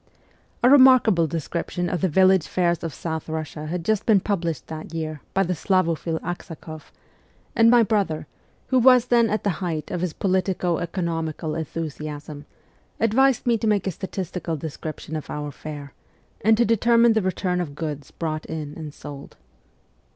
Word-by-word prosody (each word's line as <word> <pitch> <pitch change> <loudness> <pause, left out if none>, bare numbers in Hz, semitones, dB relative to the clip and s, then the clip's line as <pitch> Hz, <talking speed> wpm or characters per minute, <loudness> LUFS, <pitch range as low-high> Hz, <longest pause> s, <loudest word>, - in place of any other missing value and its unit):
A - - +7
remarkable 255 - +6
description 170 +3 -3
of 175 0 -2
the 190 - +2
village 190 +1 +4
fairs 175 -2 0
of 165 - -3
South 160 +2 -5
Russia 155 -1 -5
had 170 +1 -4
just 215 0 0
been 215 -4 +6
published 170 -6 -2
that 160 +1 -8
year 155 -2 -4
by 195 - +4
the 180 0 -1
Slavo 185 0 +1
phile 160 +1 -3
Aksakoff, 165 -3 -7 0.6
and 230 -1 +6
my 240 -1 +6
brother, 195 -8 0 0.4
who 260 -1 +4
was 250 -1 +6
then 235 -2 +4
at 215 - -1
the 200 - +2
height 165 -4 -3
of 175 - -2
his 180 -3 -2
politico 185 -2 0
economical 165 -3 -3
enthusiasm, 150 -2 -6 0.5
advised 250 +3 +3
me 235 -2 +2
to 225 - -1
make 210 -3 +2
a 190 - 0
statistical 180 -2 -4
description 155 +1 -6
of 155 - -5
our 150 0 -4
fair, 145 -1 -8 0.5
and 220 +1 +5
to 235 - +4
determine 230 +1 +4
the 220 - +2
return 185 -1 -1
of 145 -5 -5
goods 150 -3 -5
brought 155 -2 -4
in 155 -2 -5
and 155 -3 -8
sold. 145 -2 -10
170 Hz, 165 wpm, -24 LUFS, 155-200 Hz, 0.6 s, A